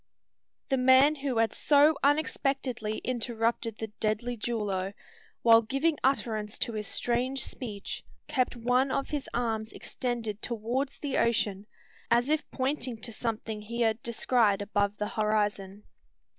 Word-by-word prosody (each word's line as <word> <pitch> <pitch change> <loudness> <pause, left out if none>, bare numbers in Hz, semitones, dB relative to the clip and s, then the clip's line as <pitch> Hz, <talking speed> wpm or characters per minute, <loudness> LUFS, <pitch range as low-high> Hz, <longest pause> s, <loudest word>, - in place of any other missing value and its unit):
The 270 - +2
man 260 +3 +6
who 275 -4 -3
had 225 0 +2
so 295 +1 +5
unexpectedly 275 -6 0
interrupted 230 -2 -1
the 220 - -3
deadly 220 +3 -1
duello, 205 -4 -2 0.5
while 230 -1 +7
giving 275 +7 0
utterance 220 -6 0
to 235 - -1
his 210 -2 -3
strange 250 +3 0
speech, 210 -6 -5 0.2
kept 260 -5 0
one 250 +3 +2
of 275 - -2
his 290 -2 -3
arms 225 -2 -1
extended 230 -4 -4
towards 245 +4 -2
the 285 -3 -1
ocean, 210 -3 +1 0.4
as 240 +3 +3
if 310 0 0
pointing 260 -3 -2
to 230 - -5
something 220 -1 -3
he 235 +3 -4
had 225 0 +2
descried 230 -3 +2
above 205 0 0
the 210 - -2
horizon. 210 -2 -1
235 Hz, 135 wpm, -29 LUFS, 215-260 Hz, 0.5 s, while